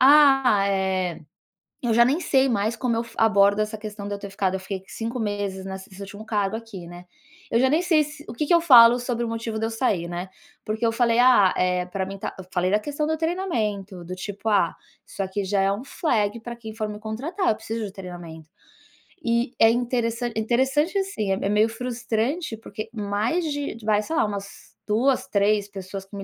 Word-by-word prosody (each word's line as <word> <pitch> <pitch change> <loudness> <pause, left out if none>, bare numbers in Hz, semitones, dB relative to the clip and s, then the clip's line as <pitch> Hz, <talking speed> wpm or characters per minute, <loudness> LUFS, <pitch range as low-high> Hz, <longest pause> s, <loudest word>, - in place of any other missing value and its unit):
"Ah, 270 -7 +6
eh" 190 -3 0 0.6
eu 235 - +2
já 235 +1 +6
nem 285 +8 +1
sei 270 -4 +3
mais 220 0 0
como 245 -1 0
eu 230 - 0
fa 230 - -12
como - - +3
eu - - +7
abordo 200 -1 +4
essa 215 +1 -1
questão 210 -1 -7
de 205 - -3
eu - - -5
ter 200 -1 -8
ficado, 195 -1 -1
eu 190 - -2
fiquei 190 0 -6
5 205 -5 -3
nessa 190 +1 -7
nesse 190 - -13
último 205 +2 -9
cargo 210 -2 -1
aqui, 210 -6 -9
né. 175 +1 -10 0.5
Eu 230 - +3
já 260 - +4
nem 315 +5 +2
se 305 -3 +1
o - - -5
que 290 +5 -2
que 345 - +4
eu 340 - +6
falo 245 -5 +8
sobre 240 -1 -2
o - - -3
motivo 225 -1 -3
de 225 - 0
eu - - -3
sair, 220 -7 0
né, 175 +2 -5 0.4
porque 220 +2 -1
eu 225 - +2
falei: 235 0 +2
"Ah, 245 -7 +6
eh, 180 0 +1
pra 190 +1 -3
mim 195 +1 -6
tá" - - -5
eu 190 - -8
falei 180 0 +1
da 210 - +4
questão 295 +6 -3
do 315 0 0
treinamento, 215 - -2
do 180 +2 -6
tipo: 205 +3 -5
"Ah, 200 -5 +3 0.3
isso 200 - -5
aqui 195 +1 -2
já 195 +1 +1
é 195 - +3
um 205 +6 -4
flag 230 -7 0
pra 235 +1 -7
quem 220 -2 -8
for 215 -2 -3
me 210 0 -6
contratar, 285 - -2
eu - - +4
preciso 225 0 -4
de 195 - -6
treinamento". 175 -4 -9 0.8
E 235 +2 +1
é 225 - +7
interessante 240 -1 -1
interessante, 265 - +1
assim, 220 - -2
é - - +3
me - - -4
é - - -1
meio 210 +2 +3
frustrante, 240 +4 -2
porque 215 0 -7
mais 215 - -1
de 290 -4 -3
vai, 210 -1 +2
sei 320 - -4
lá, - - +3
umas 200 -1 -7
2, 250 +5 +2
3 205 0 +2
pessoas 195 -1 -7
que 200 - -12
me 195 - -5
220 Hz, 225 wpm, -24 LUFS, 200-245 Hz, 0.8 s, falo